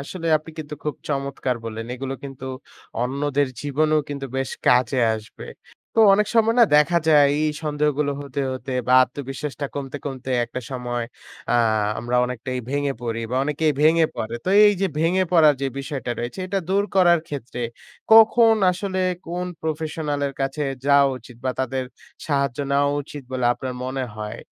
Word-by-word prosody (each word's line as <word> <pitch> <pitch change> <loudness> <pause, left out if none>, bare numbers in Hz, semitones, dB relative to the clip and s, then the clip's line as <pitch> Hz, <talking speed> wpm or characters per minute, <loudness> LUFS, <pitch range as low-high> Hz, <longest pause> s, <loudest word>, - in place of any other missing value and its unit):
আসলে 165 +4 -6
আপনি 155 +2 -9
কিন্তু 150 -1 -6
খুব 150 - -1
চমৎকার 140 -3 -2
বললেন। 115 0 -5
এগুলো 135 +1 -4
কিন্তু 135 -1 -8 0.6
অন্যদের 140 +2 0
জীবনেও 155 +2 +1
কিন্তু 140 -1 -5
বেশ 135 -1 -2 0.2
কাজে 125 +1 +4 0.2
আসবে। 110 0 -9 0.5
তো 225 - +4
অনেক 210 +1 +2
সময় 225 0 +4
না - - +9
দেখা 165 +3 +4
যায় 150 -2 +7 0.2
এই 155 - +2
সন্দেহগুলো 150 -1 0
হতে, 140 0 -4
হতে 130 +1 -6 0.2
বা 125 - +4
আত্মবিশ্বাসটা 140 +2 -6
কমতে, 140 -1 -5
কমতে 130 -2 -5
একটা 120 +2 -6
সময় 120 -2 -3 0.5
আ - - +3 0.4
আমরা 120 +2 -1
অনেকটাই 125 +1 -4
ভেঙে 145 0 0
পড়ি 115 -1 -3
বা 130 - -1
অনেকেই 150 +1 +1
ভেঙে 160 +1 +5
পড়ে। 110 +1 -4
তো - - -2 0.2
এই 205 - +6
যে 195 - +3
ভেঙে 175 +4 +2
পড়ার 155 -4 +6
যে - - +1
বিষয়টা 135 -3 -4
রয়েছে 120 +8 -5
এটা 195 +1 -1
দূর 200 +1 +2
করার 175 -3 +5
ক্ষেত্রে 130 -4 -6 0.5
কখন 225 0 +7 0.2
আসলে 185 +1 -3 0.3
কোন 175 +2 -3 0.2
প্রফেশনালের 150 -2 -2
কাছে 135 +2 -1 0.2
যাওয়া 140 -1 +5
উচিত? 120 0 -15
বা 130 - +1
তাদের 130 0 -2 0.4
সাহায্য 140 -3 0
নেওয়া 140 0 +3
উচিত 145 0 -9
বলে 130 -1 -1
আপনার 130 -1 -5
মনে 130 0 -2
হয়? 105 +1 -6
140 Hz, 165 wpm, -23 LUFS, 130-155 Hz, 0.6 s, না